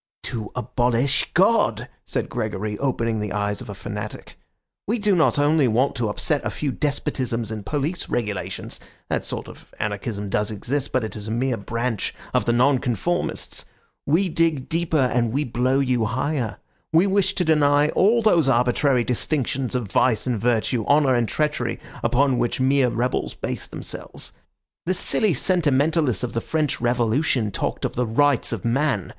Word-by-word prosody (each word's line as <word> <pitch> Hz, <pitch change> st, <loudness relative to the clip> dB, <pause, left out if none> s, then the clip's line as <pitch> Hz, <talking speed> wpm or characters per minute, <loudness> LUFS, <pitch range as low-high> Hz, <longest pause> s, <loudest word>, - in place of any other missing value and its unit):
"To 110 Hz, -3 st, -4 dB
abolish 125 Hz, +2 st, +1 dB
God!" 205 Hz, +6 st, +3 dB, 0.2 s
said -, -, -2 dB
Gregory, 110 Hz, -3 st, -3 dB
opening 115 Hz, -5 st, 0 dB
the 105 Hz, -2 st, -3 dB
eyes 105 Hz, 0 st, -1 dB
of -, -, -9 dB
a 100 Hz, -, -6 dB
fanatic. 105 Hz, +2 st, -7 dB, 0.5 s
"We 225 Hz, +4 st, +1 dB
do 205 Hz, -3 st, +2 dB
not 160 Hz, -3 st, +3 dB
only 145 Hz, -1 st, +3 dB
want 125 Hz, +5 st, +2 dB
to 115 Hz, -3 st, 0 dB
upset 145 Hz, +7 st, -1 dB
a -, -, -1 dB
few 145 Hz, -2 st, -2 dB
despotisms 125 Hz, -5 st, -2 dB
and 110 Hz, -2 st, -5 dB
police 150 Hz, -, -2 dB
regulations; 105 Hz, -5 st, -3 dB, 0.3 s
that -, -, 0 dB
sort -, -, -4 dB
of -, -, -14 dB
anarchism 105 Hz, 0 st, -3 dB
does 105 Hz, +1 st, 0 dB
exist, 125 Hz, +7 st, -3 dB
but 130 Hz, -, +1 dB
it 110 Hz, -, -5 dB
is 105 Hz, 0 st, -7 dB
a -, -, -3 dB
mere 125 Hz, +2 st, 0 dB
branch 115 Hz, +1 st, -3 dB, 0.2 s
of -, -, +2 dB
the -, -, +2 dB
Nonconformists. 130 Hz, -, 0 dB, 0.4 s
We 170 Hz, +7 st, +3 dB
dig 160 Hz, -5 st, 0 dB
deeper 165 Hz, -1 st, 0 dB
and 125 Hz, -4 st, +2 dB
we 140 Hz, +5 st, 0 dB
blow 125 Hz, +1 st, +1 dB
you 125 Hz, -4 st, +1 dB
higher. 125 Hz, +1 st, -2 dB, 0.3 s
We 165 Hz, +4 st, +5 dB
wish 195 Hz, 0 st, +1 dB
to 180 Hz, -, 0 dB
deny 145 Hz, -1 st, +4 dB
all 225 Hz, +7 st, +3 dB
those 170 Hz, -10 st, +4 dB
arbitrary 125 Hz, +1 st, +3 dB
distinctions 130 Hz, +1 st, -1 dB
of 115 Hz, -6 st, -2 dB
vice 115 Hz, -4 st, +2 dB
and 125 Hz, -4 st, -1 dB
virtue, 120 Hz, 0 st, +1 dB
honour 145 Hz, -2 st, +4 dB
and 120 Hz, -2 st, +2 dB
treachery, 150 Hz, -1 st, -1 dB, 0.2 s
upon 135 Hz, -1 st, +2 dB
which 120 Hz, -, 0 dB
mere 130 Hz, 0 st, +3 dB
rebels 120 Hz, +2 st, -1 dB
base -, -, -4 dB
themselves. -, -, -8 dB, 0.5 s
The 185 Hz, -, +2 dB
silly 195 Hz, 0 st, +1 dB
sentimentalists 150 Hz, -, +2 dB
of 120 Hz, -, -3 dB
the 115 Hz, -, -1 dB
French 155 Hz, -2 st, -1 dB
Revolution 120 Hz, 0 st, +1 dB
talked -, -, -2 dB
of -, -, -2 dB
the 125 Hz, 0 st, -1 dB
Rights 140 Hz, +3 st, +2 dB
of 115 Hz, -3 st, -4 dB
Man! 125 Hz, -, +1 dB
125 Hz, 165 wpm, -23 LUFS, 115-150 Hz, 0.5 s, We